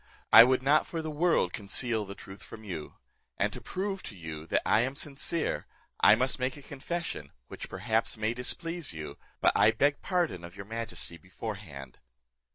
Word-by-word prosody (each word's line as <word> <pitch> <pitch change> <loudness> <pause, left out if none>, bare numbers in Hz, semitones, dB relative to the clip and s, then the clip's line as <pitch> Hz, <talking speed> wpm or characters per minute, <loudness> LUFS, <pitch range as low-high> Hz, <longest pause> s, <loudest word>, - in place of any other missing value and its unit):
I 115 - +13
would 130 +1 +2
not 145 +3 +4
for 165 -1 -4
the 155 - -3
world 150 - +2
conceal 110 +2 0
the 100 0 -8
truth 95 0 -11
from 110 - -11
you; 85 -7 -6 0.4
and - - +1
to - - -7
prove 195 0 -3
to 100 - -8
you 80 -2 -7
that - - +1
I 105 - +5
am 130 +4 0
sincere, 150 +3 -1 0.3
I - - +8
must 130 +1 0
make 130 +2 -1
a 145 - -12
confession, 140 - -4 0.2
which - - -7
perhaps 115 0 0
may 110 +1 0
displease 165 - -2
you, 75 -3 -7 0.2
but - - +6
I 105 - +6
beg 145 +6 +2
pardon 170 - 0
of 85 +1 -10
your 100 - -8
majesty 115 -5 -4
beforehand." 90 - -8
115 Hz, 180 wpm, -30 LUFS, 95-145 Hz, 0.4 s, I